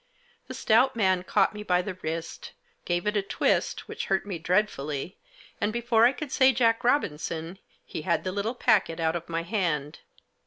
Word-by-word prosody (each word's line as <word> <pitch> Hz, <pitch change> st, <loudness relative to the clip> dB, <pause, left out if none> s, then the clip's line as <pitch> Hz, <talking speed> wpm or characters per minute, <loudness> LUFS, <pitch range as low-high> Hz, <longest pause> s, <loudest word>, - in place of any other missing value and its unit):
The -, -, -7 dB
stout 250 Hz, +4 st, +3 dB
man 190 Hz, -5 st, +2 dB
caught 185 Hz, -, +2 dB
me 210 Hz, -, -7 dB
by 180 Hz, -3 st, +1 dB
the 190 Hz, -, -4 dB
wrist, 165 Hz, -2 st, -6 dB, 0.3 s
gave 175 Hz, 0 st, -1 dB
it 210 Hz, 0 st, 0 dB
a 205 Hz, -, +2 dB
twist, 195 Hz, -, 0 dB
which -, -, -5 dB
hurt 195 Hz, +1 st, 0 dB
me 190 Hz, -5 st, -5 dB
dreadfully, 165 Hz, -4 st, -1 dB, 0.4 s
and, 205 Hz, -, +1 dB
before 235 Hz, 0 st, +3 dB
I -, -, +2 dB
could 275 Hz, +1 st, -7 dB
say 260 Hz, 0 st, +5 dB
Jack 230 Hz, -1 st, +2 dB
Robinson, 170 Hz, -, -1 dB, 0.3 s
he -, -, -6 dB
had 170 Hz, +2 st, 0 dB
the 185 Hz, -, -2 dB
little 205 Hz, +5 st, -2 dB
packet 180 Hz, -8 st, +2 dB
out 160 Hz, 0 st, +1 dB
of 170 Hz, 0 st, -5 dB
my 165 Hz, 0 st, -2 dB
hand. 165 Hz, -6 st, -2 dB
190 Hz, 185 wpm, -27 LUFS, 165-225 Hz, 0.4 s, say